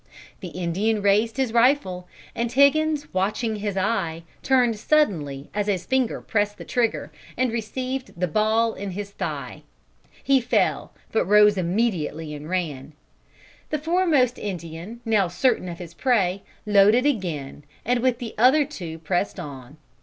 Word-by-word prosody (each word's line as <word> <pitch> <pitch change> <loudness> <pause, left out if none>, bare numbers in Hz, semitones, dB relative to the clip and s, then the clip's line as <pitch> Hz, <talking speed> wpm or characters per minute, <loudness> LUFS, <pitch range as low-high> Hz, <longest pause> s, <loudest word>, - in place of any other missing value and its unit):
"The 185 - -7
Indian 185 +5 -1
raised 215 +4 +2
his 260 -4 0
rifle, 230 -8 +2 0.3
and 235 0 -2
Higgins, 290 +3 +3
watching 215 +4 -1
his 205 -1 -3
eye, 185 -5 -1 0.2
turned 245 -5 +2
suddenly 165 - 0
as 205 0 -1
his 190 -4 -1
finger 260 -3 0
pressed 205 -1 -1
the - - -9
trigger, 215 - -1 0.3
and 255 -1 +1
received 255 0 -4
the 180 - +1
ball 220 +5 +2
in 200 +1 -6
his 200 +1 -6
thigh. - - -5 0.6
He 270 -1 +3
fell, 240 - 0 0.2
but 220 - +1
rose 210 0 +6
immediately 175 -5 -1
and 150 +1 -8
ran. 155 -6 -3 0.8
The 305 - 0
foremost 305 -6 +2
Indian, 180 +3 -6
now 215 -4 +2
certain 185 +2 0
of 170 - -7
his 170 -2 -9
prey, 195 -3 +1 0.2
loaded 210 +4 +5
again, 170 - -2 0.2
and 245 +1 +2
with 250 -1 +1
the 235 -3 -6
other 270 +5 +5
two 175 - -7
pressed 175 +5 -2
on. 140 -3 -9
210 Hz, 145 wpm, -24 LUFS, 175-245 Hz, 0.8 s, rose